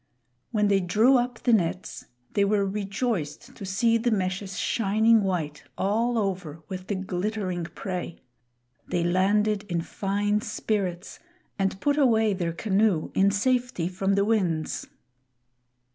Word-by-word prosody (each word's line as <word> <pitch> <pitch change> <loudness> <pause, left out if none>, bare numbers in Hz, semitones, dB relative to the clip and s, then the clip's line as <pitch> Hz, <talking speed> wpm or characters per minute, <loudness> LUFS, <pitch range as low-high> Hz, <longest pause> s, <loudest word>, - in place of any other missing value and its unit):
When 210 -3 +1
they 200 -1 +3
drew 215 +9 +4
up 245 -1 -1
the 240 - +3
nets 185 -2 -1 0.3
they 200 - +3
were 200 0 +2
rejoiced 200 - -3
to 205 - -9
see 230 +4 +2
the 240 +2 +1
meshes 190 -2 -2
shining 220 +1 +3
white, 170 -6 -2
all 230 +5 +1
over, 180 -7 -3
with 185 -1 -7
the 205 - -1
glittering 185 -1 -2
prey. 180 -1 -5 0.7
They 175 - 0
landed 200 +4 +2
in 170 -1 0
fine 205 +4 -1
spirits, 195 -4 -3 0.4
and 195 0 0
put 290 +5 +1
away 225 -6 +4
their 175 -3 -2
canoe 195 -1 +1
in 195 +1 +4
safety 245 -2 0
from 195 +2 0
the 200 0 +2
winds. 180 -8 0
200 Hz, 135 wpm, -26 LUFS, 185-220 Hz, 0.7 s, drew